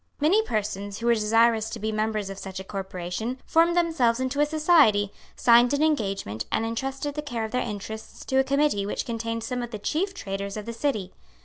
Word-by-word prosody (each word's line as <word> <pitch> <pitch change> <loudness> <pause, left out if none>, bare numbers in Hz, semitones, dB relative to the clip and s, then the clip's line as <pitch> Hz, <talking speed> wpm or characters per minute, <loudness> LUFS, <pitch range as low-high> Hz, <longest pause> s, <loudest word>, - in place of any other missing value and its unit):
Many 335 +9 +4
persons 205 - -3
who 230 - -5
were 235 - +5
desirous 225 0 +3
to 230 - -5
be 220 0 -2
members 215 -2 -1
of 195 - -8
such 190 -1 -6
a - - -6
corporation, 190 +4 -4
formed 335 +2 +3
themselves 285 -9 +2
into 260 +2 -2
a 295 - +4
society, 295 - +4 0.2
signed 240 +3 +5
an 290 - +1
engagement, 195 - -1
and 225 - +1
entrusted 270 +5 -3
the 300 - -3
care 240 -6 -3
of 220 - -7
their 250 - 0
interests 220 0 -6
to 265 - 0
a 265 - +5
committee 275 -7 +1
which - - -2
contained 230 -1 -3
some 250 +1 -3
of 240 - -4
the 220 - -5
chief 365 - -1
traders 200 - -4
of 210 - -6
the 230 - -5
City. 225 -7 -2
230 Hz, 210 wpm, -26 LUFS, 205-280 Hz, 0.2 s, were